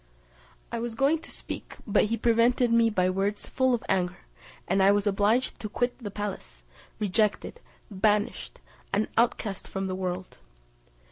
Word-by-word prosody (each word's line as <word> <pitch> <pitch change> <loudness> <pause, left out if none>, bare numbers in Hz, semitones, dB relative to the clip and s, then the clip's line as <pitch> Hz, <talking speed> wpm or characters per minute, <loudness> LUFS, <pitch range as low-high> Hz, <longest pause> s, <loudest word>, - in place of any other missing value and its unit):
I 235 - -2
was 235 -1 -4
going 280 +6 +3
to - - -13
speak, - - -7
but 210 - +3
he 230 +2 -1
prevented 235 +1 +3
me 230 -1 +5
by 185 -4 +1
words 195 +3 -1
full 260 -1 +2
of 230 - -6
anger; 180 -2 0 0.5
and 195 - +2
I 195 +1 +6
was 205 0 +2
obliged 210 +5 +1
to 215 - -5
quit 245 +3 -1
the 220 -5 -5
palace, 190 - -6 0.3
rejected, 210 - 0 0.3
banished, 210 +1 0 0.3
an 210 +2 +1
outcast 225 -4 0
from 195 0 -3
the 190 - -2
world. 185 - -4
210 Hz, 155 wpm, -27 LUFS, 195-230 Hz, 0.5 s, I